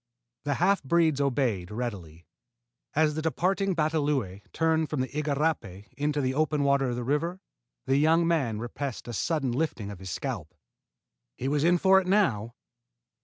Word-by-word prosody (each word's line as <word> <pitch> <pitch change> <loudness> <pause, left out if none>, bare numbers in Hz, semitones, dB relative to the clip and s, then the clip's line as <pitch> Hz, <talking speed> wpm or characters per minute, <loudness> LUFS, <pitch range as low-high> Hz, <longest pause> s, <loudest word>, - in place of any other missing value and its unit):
The 145 -1 0
half 195 +3 +2
breeds 160 0 +2
obeyed 120 -10 0
readily. 95 -8 -6 0.7
As 155 0 +3
the 155 - -3
departing 185 +4 0
batalõe 145 - 0
turned 160 -1 +1
from 150 -4 -1
the 130 - -2
igarapé 145 - -2
into 145 +2 0
the 130 -1 0
open 150 0 +1
water 140 -2 +2
of 120 - -2
the 120 - -3
river, 165 +8 -1 0.5
the 135 - +2
young 165 +3 +4
man 135 -10 +1
repressed 120 +3 -5
a 120 - -5
sudden 145 +1 0
lifting 120 -7 -2
of 100 - -9
his 95 -1 -7
scalp. - - -4 0.8
He 130 - -3
was 145 +1 +1
in 175 +2 +4
for 190 +2 +5
it 185 - -8
now! 120 - +1
145 Hz, 165 wpm, -27 LUFS, 120-160 Hz, 0.8 s, for